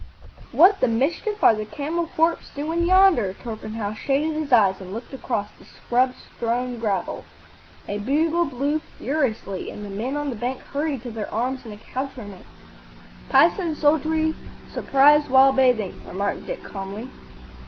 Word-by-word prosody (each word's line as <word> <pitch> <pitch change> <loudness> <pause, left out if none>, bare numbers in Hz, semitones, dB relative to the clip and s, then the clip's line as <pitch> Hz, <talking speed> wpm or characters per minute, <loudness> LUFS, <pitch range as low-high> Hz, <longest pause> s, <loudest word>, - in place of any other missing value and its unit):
What 380 +5 +6
the - - +3
mischief 320 - -1
are - - +8
the 215 0 -3
camel 315 +8 -3
corps 330 +1 +3 0.2
doing 325 +4 -1
yonder?" 370 - +5
Torpenhow 215 -2 -5
shaded 280 +7 0
his 305 -2 -4
eyes 200 -6 +4
and 185 0 -9
looked 230 +6 -7
across 240 -6 -3
the - - -16
scrub 250 +1 0
strewn 240 +1 -3
gravel. 205 -5 -2 0.6
A 205 - -3
bugle 315 +9 +1
blew 280 +3 -1 0.2
furiously, 230 - -2
and 210 - -8
the 200 - -8
men 240 +8 -3
on 290 -1 -2
the - - -5
bank 245 +4 -3
hurried 285 -3 -3
to 245 - -6
their 220 -2 -5
arms 250 +4 -2
and 220 - -8
accoutrements. 225 -4 -7 0.8
""Pisan 330 +3 +3
soldiery 315 +1 +2 0.4
surprised 290 +2 +4
while 265 +1 +6
bathing,"' 250 -7 +2
remarked 200 +2 -3
Dick, - - -5
calmly. 200 +4 -7
260 Hz, 150 wpm, -23 LUFS, 220-305 Hz, 0.8 s, are